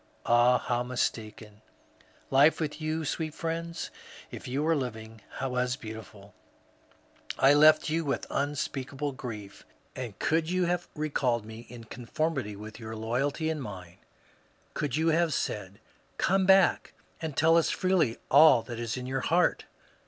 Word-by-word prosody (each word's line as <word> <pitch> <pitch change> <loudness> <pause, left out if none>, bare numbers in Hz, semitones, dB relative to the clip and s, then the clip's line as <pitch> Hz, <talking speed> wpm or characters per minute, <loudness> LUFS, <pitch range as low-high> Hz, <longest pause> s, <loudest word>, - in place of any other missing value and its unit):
Ah, 120 +1 +5
how 120 0 -1
mistaken 110 -3 -4
I - - -33 0.3
Life 145 +4 +6
with 155 0 -3
you, 155 +1 -2
sweet 155 +1 -3
friends, 165 +1 -4 0.2
— - - -17
if - - -8
you 135 +4 -1
are 165 0 +3
living 110 -5 -5
— - - -10
was 125 -1 0
beautiful 110 -4 -10 1.0
I 135 - +6
I - - +7
left 155 +1 +6
you 160 +2 0
with 140 -2 -2
unspeak 140 -1 -2
able 145 +1 -2
grief; 110 -6 -8 0.3
and 120 -6 -6
could 160 +1 0
you 185 0 +1
have 175 0 -1
recalled 130 -7 0
me 110 +2 -10
in 120 -1 -10
conformity 125 0 -3
with 105 +3 -10
your 110 -1 -7
loyalty 130 +8 -1
and 155 -2 -4
mine, 90 -7 -9 0.7
could 145 -4 -2
you 160 +2 +2
have 165 -2 +2
said, 95 -6 -3
^^ - - -22 0.4
Come 190 0 +2
back 190 -1 +4 0.3
and 160 -4 -5
tell 160 +2 +5
us 165 - +3
freely 180 -11 +1
all 140 -4 +7
that 120 -2 -7
is 120 0 -3
in 125 - -5
your 130 +1 -2
heart 175 +6 +2
135 Hz, 165 wpm, -28 LUFS, 115-160 Hz, 1.0 s, I